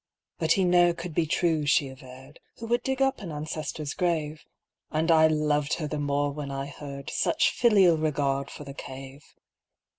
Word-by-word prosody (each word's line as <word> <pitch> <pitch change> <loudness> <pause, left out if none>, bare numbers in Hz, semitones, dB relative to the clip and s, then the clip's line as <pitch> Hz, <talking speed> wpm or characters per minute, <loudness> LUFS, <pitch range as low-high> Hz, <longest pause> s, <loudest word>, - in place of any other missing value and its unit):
But 160 -2 +3
he 195 - +1
ne'er 175 -1 +4
could 170 -1 -7
be 160 +1 +1
true, 160 -2 +1
she 145 -1 +3
averred, 130 +2 -13 0.2
Who 230 - -7
would 240 +2 +1
dig 265 0 0
up 270 -2 0
an 180 -5 -6
ancestor's 150 -1 -4
grave 155 -4 -2 0.5
â - - -2
And 160 +2 +2
I 160 -1 +6
loved 150 -1 +1
her 155 - -4
the 150 0 -3
more 145 0 0
when 145 -1 -6
I 135 0 -4
heard 140 0 -8
Such - - +2
filial 195 -8 +4
regard 140 -3 -1
for - - -9
the 140 -1 -9
Cave. 135 +1 -9
150 Hz, 185 wpm, -27 LUFS, 140-170 Hz, 0.5 s, I